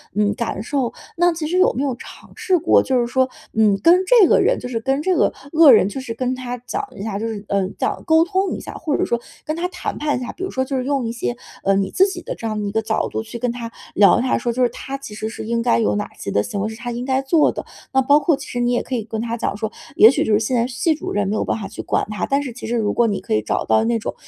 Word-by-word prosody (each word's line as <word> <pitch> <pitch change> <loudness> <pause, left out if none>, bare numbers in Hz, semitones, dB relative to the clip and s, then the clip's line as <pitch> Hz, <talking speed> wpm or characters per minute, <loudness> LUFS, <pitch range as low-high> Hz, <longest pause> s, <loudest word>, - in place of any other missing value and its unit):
嗯， 210 0 +2
感 230 -5 -3
受。 260 -1 -1 0.2
那 350 +1 +3
其 325 -1 -4
实 355 +4 0
有 370 - +5
没 270 - 0
有 275 -2 0
尝 - - -13
试 370 - +1
过， 315 - +4
就 260 -2 +1
是 240 - +1
说， 260 +2 +1 0.2
嗯， 210 -3 +3
跟 355 +2 +6
这 455 -5 +7
个 - - +4
人 - - +2
就 - - -6
是 240 -2 -2
跟 270 +4 0
这 370 +1 +2
个 - - +3 0.2
恶 315 -3 +8
人， 215 -5 +6
就 265 +6 -5
是 260 -3 -7
跟 255 +2 -2
他 250 -1 -5
讲 250 - -4
一 200 - -7
下， 205 -2 -3
就 225 - -2
是， 215 -3 -5
呃， 200 -2 +1
讲 - - -1
沟 320 -1 +5
通 380 +2 0
一 - - -4
下， - - -8
或 305 -3 -2
者 - - 0
说 235 - 0 0.3
跟 310 - -2
他 345 +2 -1
谈 360 -1 -5
判 295 0 0
一 - - -5
下。 245 - -4
比 375 - -8
如 380 - -2
说 260 - -1
就 265 0 -3
是 255 - -1
用 275 -3 0
一 225 - -2
些， 120 - -3 0.3
呃， 195 - +3
你 195 -1 0
自 385 - +4
己 360 -3 -6
的 - - -5
这 230 - -5
样 215 -1 -3
的 - - -3
一 - - -3
个 220 +2 0
角 220 0 -1
度 - - -3
去 225 +1 -8
跟 245 +1 -1
他 235 -1 -6 0.2
聊， 200 0 +5
他 255 - +1
说 240 - -1
就 255 +2 +1
是 245 - +3
他 275 +3 -6
其 275 -6 -10
实 215 +1 -4
是 220 - -7
应 230 +1 0
该 235 0 +2
有 220 - +1
哪 205 0 -3
些 100 - -5
的 100 - +2
行 200 - -4
为 215 - -1
是 220 - -7
他 240 +1 -5
应 240 +1 -4
该 265 0 +1
做 295 +3 +3
的。 - - -6 0.3
那 265 - +4
包 285 +3 +5
括 315 +1 +2
其 - - -9
实 245 - -4
你 240 0 +1
也 245 - +1
可 260 - -4
以 230 - -2
跟 220 0 -5
他 230 0 -2
讲 225 - -2
说， 220 0 -3 0.2
也 220 - +9
许 270 - +1
就 - - -1
是 210 - +4
现 225 +4 -1
在 235 -1 +2
系 265 +6 0
主 305 - -6
任 205 -1 0
没 205 - -1
有 - - 0
办 - - -1
法 200 - -5
去 210 - -7
管 - - -1
他， 210 - -2
但 275 +1 +1
是 265 -4 -6
其 245 - -8
实 240 +1 0
如 210 -2 0
果 235 - +3
你 205 -3 -1
可 - - -4
以 110 - +2
找 105 - -2
到 110 0 +3
那 230 0 +1
种 - - -4
245 Hz, 345 characters per minute, -20 LUFS, 220-285 Hz, 0.3 s, 也